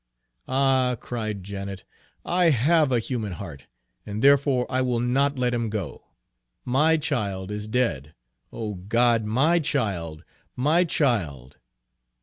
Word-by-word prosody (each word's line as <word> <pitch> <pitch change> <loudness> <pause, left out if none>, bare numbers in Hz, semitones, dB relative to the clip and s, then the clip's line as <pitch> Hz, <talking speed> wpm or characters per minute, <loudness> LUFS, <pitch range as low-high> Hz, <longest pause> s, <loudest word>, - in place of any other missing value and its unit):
"Ah," 130 -2 +2
cried 110 -5 -4
Janet, 100 -1 -6 0.4
"I 175 -1 +3
have 150 +2 +3
a 125 - +3
human 110 -4 -3
heart, 80 -8 -9 0.4
and 105 +1 -5
therefore 140 -2 +4
I 130 0 0
will 125 -2 0
not 135 +4 +1
let 125 -1 0
him 115 -2 -1
go. 105 -4 -5 0.6
My 150 +6 +3
child 105 - -2
is 105 0 -5
dead 80 - -1 0.4
O 110 -2 -5
God, 115 +4 +1
my 140 +11 +3
child, 95 - -2 0.3
my 155 +8 +3
child!" 85 - -1
120 Hz, 130 wpm, -25 LUFS, 100-135 Hz, 0.6 s, therefore